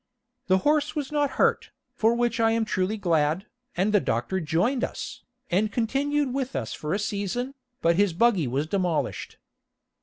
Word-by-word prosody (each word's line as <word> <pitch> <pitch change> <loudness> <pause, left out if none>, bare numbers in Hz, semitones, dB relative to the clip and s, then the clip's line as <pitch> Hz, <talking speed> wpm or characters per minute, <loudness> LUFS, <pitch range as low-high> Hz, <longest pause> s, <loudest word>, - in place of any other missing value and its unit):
The 185 0 +4
horse 300 +1 +2
was 290 -2 -3
not 290 -1 +1
hurt, - - +2 0.2
for 225 +1 +2
which 240 0 0
I 225 0 +4
am 225 -1 +1
truly 190 +1 -1
glad, 165 -1 +1 0.3
and 200 +4 +1
the 205 - +6
doctor 125 +7 -1
joined 185 - 0
us, - - -5 0.3
and 205 +4 +2
continued 275 +4 0
with 270 -1 -2
us - - -3
for 155 +4 -2
a - - +1
season, 210 +5 -2 0.3
but 170 0 +3
his 200 -1 +3
buggy 195 - +3
was 135 +5 -1
demolished. 170 -5 -2
210 Hz, 170 wpm, -26 LUFS, 175-245 Hz, 0.3 s, the